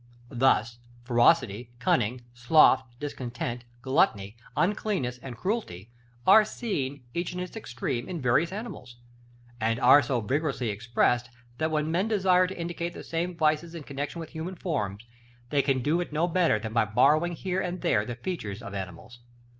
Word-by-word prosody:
Thus, 120 -2 +2 0.2
ferocity, 120 -2 +3
cunning, 120 0 +1
sloth, 130 +2 +5 0.2
discontent, 125 -3 -5 0.2
gluttony, 120 - +1 0.2
uncleanness, 180 - 0
and 125 -2 -8
cruelty 120 - -3 0.3
are 215 +3 +8
seen, 145 - -4
each 170 +1 -2
in - - -4
its 180 +3 -6
extreme, 120 - -4
in 175 -2 -4
various 130 +6 +2
animals; 195 - -7 0.6
and 115 +1 0
are 145 - +7
so 130 -4 -1
vigorously 130 +1 -1
expressed, 120 +3 +1 0.3
that 160 - +1
when 155 0 0
men 185 +5 +1
desire 185 -4 +3
to 185 0 -8
indicate 170 0 -4
the - - -8
same 170 +1 -3
vices 160 +1 +1
in 165 - -7
connexion 145 +4 -5
with 165 - -7
human 165 +3 -5
forms, 110 - -3 0.5
they 145 -1 +3
can 135 -3 0
do 160 +6 +2
it 175 - -5
no 160 +3 +1
better 175 -9 +2
than 110 +1 -6
by 115 -1 +3
borrowing 145 +11 +3
here 185 +2 -2
and 180 -1 -4
there 105 - +2
the 120 +2 -5
features 120 - -5
of 100 -2 -7
animals. 100 +5 -7
140 Hz, 160 wpm, -27 LUFS, 120-175 Hz, 0.6 s, are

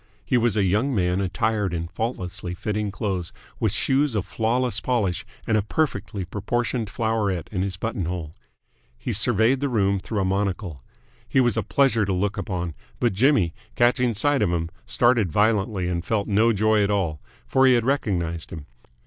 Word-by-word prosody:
He - - 0
was 120 -3 +2
a 100 - +3
young 105 +8 +1
man 90 -1 +1
attired 100 0 0
in 85 0 -3
faultlessly 90 -3 -4
fitting 105 +2 -2
clothes, 95 -4 -3 0.3
with - - +1
shoes 135 -2 +1
of 105 - 0
flawless 115 0 0
polish 105 -5 -1 0.2
and 110 - +1
a 105 - +3
perfectly 110 - -2
proportioned 115 +4 -2
floweret 110 -6 -1
in 95 -3 -1
his 95 -2 -2
buttonhole. 90 -7 -3 0.6
He - - -3
surveyed 115 +6 +3
the 140 0 -1
room 100 -4 +1
through 100 +2 -3
a - - 0
monocle. 95 - -2 0.5
He 135 - +3
was 120 -4 +3
a - - +1
pleasure 130 -6 +2
to 95 - -1
look 100 +2 0
upon, 90 -5 -3 0.3
but 120 -4 +2
Jimmy, 105 - +3 0.2
catching 120 -1 +2
sight 145 +5 +2
of 105 - +2
him, 85 -1 -2 0.2
started 120 -5 +2
violently 105 -1 +1
and 85 -1 -2
felt 105 +1 -1
no 110 +3 +3
joy 110 0 +3
at 100 - 0
all; 90 -7 -1 0.2
for 135 0 +4
he 130 - +6
had 120 -1 +1
recognised 90 -11 -1
him. 80 -3 -8
105 Hz, 175 wpm, -24 LUFS, 90-115 Hz, 0.6 s, he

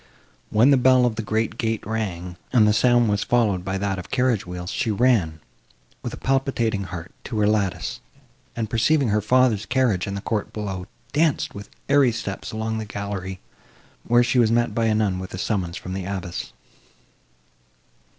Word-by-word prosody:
When 115 +6 +5
the 140 - +6
bell 130 -1 +5
of 120 - +1
the 110 - -2
great 110 +1 -1
gate 115 -1 -1
rang, 95 -5 -3 0.2
and 115 -4 +5
the 105 - +4
sound 120 +1 +4
was 105 -1 +1
followed 105 -7 +1
by 95 +1 -2
that 95 -1 -2
of 90 - -9
carriage 125 -7 +1
wheels, 90 0 -5
she 115 - -1
ran, 105 -8 +2 0.6
with - - -4
a - - -7
palpitating 125 -7 0
heart, 90 0 -7
to 115 - -4
her 105 - +3
lattice, 105 -4 0 0.6
and, 115 -2 -2
perceiving 125 +4 +2
her 105 +1 +2
father's 115 -1 +2
carriage 125 -9 +1
in 100 - -3
the 100 - -4
court 110 -1 -2
below, 95 -3 -5 0.3
danced, 155 -1 +1
with 100 0 -9 0.2
airy 140 -3 +4
steps, 110 -3 -5
along 110 0 -2
the 110 - -4
gallery, 100 -2 -5 0.6
where 120 +1 +4
she 120 +1 +2
was 115 -2 +4
met 120 -2 +2
by 115 +1 +1
a 110 - +2
nun 100 -4 +1
with 95 0 -6
a - - -6
summons 90 -3 -2
from 90 - -6
the 95 -1 -4
abbess. 90 -2 -5
110 Hz, 185 wpm, -23 LUFS, 95-120 Hz, 0.6 s, the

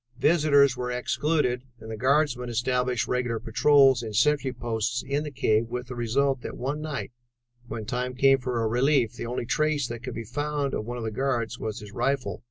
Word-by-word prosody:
Visitors 145 -2 +4
were 125 0 -3
excluded, 125 +1 0 0.2
and 110 0 -9
the - - -4
guardsmen 130 0 +1
established 125 +1 0
regular 125 -2 -1
patrols 135 +2 +4
and 110 -3 -6
sentry 140 +3 +2
posts 120 0 -2
in 140 +2 -1
the 150 - -4
cave 115 -4 +1
with 125 +1 -4
the 125 - -5
result 130 +3 0
that - - -7
one 140 +4 -3
night, 150 -4 -4 0.6
when 110 -2 -5
time 125 +3 -3
came 135 +1 +5
for 125 -2 -2
a - - +1
relief, 125 0 +2
the - - -6
only 120 0 -3
trace 150 +1 +1
that 120 -1 -6
could - - -6
be 115 - -4
found 145 +4 -2
of 110 - -3
one 120 0 -4
of 120 - -5
the 110 - -2
guards 120 -1 -1
was 110 +1 -4
his 105 -1 -10
rifle. 120 -6 -1
125 Hz, 200 wpm, -26 LUFS, 115-140 Hz, 0.6 s, came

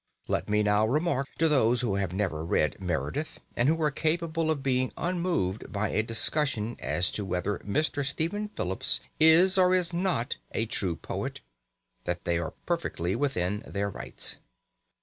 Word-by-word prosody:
Let - - -1
me 105 0 +3
now 105 +1 +3
remark 140 +1 +1
to 165 - +4
those 125 -5 +3
who 115 -5 0
have 100 -3 -1
never 90 -5 -1
read 75 -2 +1
Meredith, 90 - -2 0.2
and 120 +4 +3
who 165 +1 +2
are 150 - +3
capable 160 +2 0
of 150 -4 0
being 130 -1 +1
unmoved 170 - -1
by 105 0 -1
a - - +2
discussion 115 0 +1
as 90 0 0
to 105 - -3
whether 95 +2 -2
Mr. 145 +6 0
Stephen 165 +10 -1
Phillips 95 - 0 0.2
is 175 +5 +6
or 185 0 +5
is 180 -1 +1
not 175 -9 0 0.2
a 110 - +1
true 95 -6 0
poet, - - -5 0.6
that - - -3
they 85 0 +1
are 80 - -4
perfectly 100 - -1
within 105 -7 -1
their 100 0 -2
rights. - - -5
125 Hz, 165 wpm, -28 LUFS, 100-160 Hz, 0.6 s, is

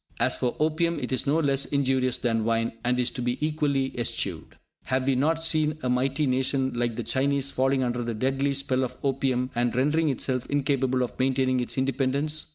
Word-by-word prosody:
As - - +2
for 125 - -1
opium, 160 +2 +1
it - - -4
is 130 +2 -1
no 145 +3 +3
less 140 -3 +2
injurious 130 -2 +1
than 115 -3 0
wine, 115 +1 +1
and 125 +1 +1
is 125 -1 +1
to - - -5
be 125 +1 -1
equally 150 -3 0
eschewed. 120 -1 -4 0.3
Have 130 +1 0
we 135 - +3
not 160 +5 +1
seen 155 -1 +1
a 125 - 0
mighty 135 +4 +1
nation 130 0 0
like 120 -1 -1
the 120 - -3
Chinese 140 +4 0
falling 135 0 +1
under 120 0 -1
the 115 -1 -3
deadly 135 +4 0
spell 135 -1 0
of 125 0 -4
opium, 130 -2 0
and 120 0 0
rendering 150 +5 +2
itself 130 -1 -1
incapable 135 -3 +1
of 125 - -6
maintaining 130 0 +2
its 125 - -3
independence? 135 +3 -1
130 Hz, 195 wpm, -26 LUFS, 125-140 Hz, 0.3 s, no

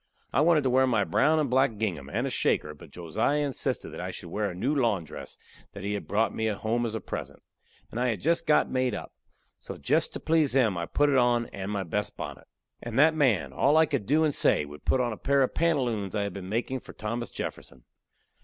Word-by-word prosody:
I - - +3
wanted 160 -2 +4
to 130 - +2
wear 130 +1 +4
my 115 -5 +2
brown 140 - +2
and 150 -2 +1
black 125 -3 +2
gingham, 85 -11 -3
and - - -1
a - - -2
shaker, 75 - 0
but 75 - -14
Josiah 110 - -1
insisted 135 -3 -2
that - - -7
I - - -4
should 85 - -8
wear 105 +1 -1
a 90 - -7
new 120 +11 0
lawn 115 - +1
dress 75 - -10 0.4
that 100 - -8
he 100 +1 -2
had 105 - -5
brought 110 +2 +1
me 110 - -1
home 110 +3 -1
as 110 - -5
a - - -2
present, - - -7 0.5
and 115 - -4
I 125 - +1
had 110 -5 -1
jest 165 - 0
got 150 - +4
made 130 -3 0
up. - - -8 0.5
So - - -8
jest - - +1
to - - -5
please 155 -4 +2
him, 120 -7 +3
I 85 -1 -3
put 145 0 +2
it 135 - +3
on, 120 -1 +3
and 100 +1 -5
my 100 -2 -1
best 105 +4 -3
bonnet. - - -7 0.3
And 120 0 -5
that 155 +3 +6
man, 135 -10 +1
all 145 +3 +3
I 160 - +6
could 105 - -3
do 155 +5 +3
and 150 -2 +2
say, 75 - +2
would 75 +1 -12
put 130 - +2
on 120 -2 -1
a - - -8
pair 140 0 +2
of 130 - -1
pantaloons 125 - 0
I 105 - 0
had 100 -2 -4
been 95 -1 -7
a - - -8
makin' 120 +5 -1
for - - -13
Thomas 115 +3 -4
Jefferson. - - -7
120 Hz, 245 wpm, -27 LUFS, 100-140 Hz, 0.5 s, that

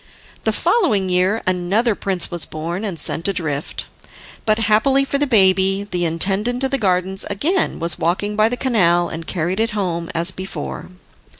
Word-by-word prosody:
The - - +3
following 205 - +1
year 185 +5 +1
another 185 +6 +1
prince 190 -3 -2
was 175 -2 +2
born 170 +5 -4
and 190 -7 -4
sent 165 - -2
adrift, 155 -7 -3 0.6
but 215 0 +3
happily 225 +6 +3
for 280 0 -1
the 290 - +1
baby, 195 -3 +3
the 175 -1 0
intendant 195 +10 0
of 265 - 0
the 275 - 0
gardens 190 -1 0
again 315 - 0
was 170 +1 -1
walking 205 +5 -1
by 215 +1 +3
the 245 - -3
canal, 175 -10 +2
and 165 0 -7
carried 180 +2 -2
it 225 +1 +1
home 170 -4 -2
as 170 +3 +4
before. 190 +1 -6
190 Hz, 170 wpm, -19 LUFS, 175-220 Hz, 0.6 s, as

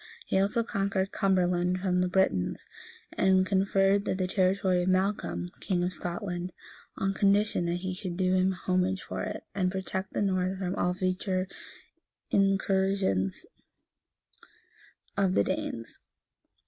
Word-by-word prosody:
He 190 - +1
also 205 +4 +2
conquered 195 -2 -1
Cumberland 180 -2 +1
from 180 -1 +1
the 180 - +2
Britons; 180 - +1 0.5
and 190 0 +3
conferred 195 +1 +2
that 185 -1 0
territory 185 -1 +2
on 180 +1 +1
Malcolm, 135 - 0
king 180 -2 0
of 180 +1 -1
Scotland, 175 +1 -4 0.4
on 195 0 0
condition 200 -2 +2
that 170 - 0
he 185 - -1
should 180 -2 -5
do 185 -1 +2
him 185 0 +3
homage 185 0 0
for - - -5
it, 210 0 -4
and 185 -2 0
protect 190 0 -4
the - - 0
north 185 -1 0
from 185 -1 -2
all 180 -1 0
future 185 0 -1 0.8
incursions 195 - +1 1.7
of 195 -2 +2
the 100 - +4
Danes. 115 +3 -4
185 Hz, 135 wpm, -29 LUFS, 180-195 Hz, 1.7 s, the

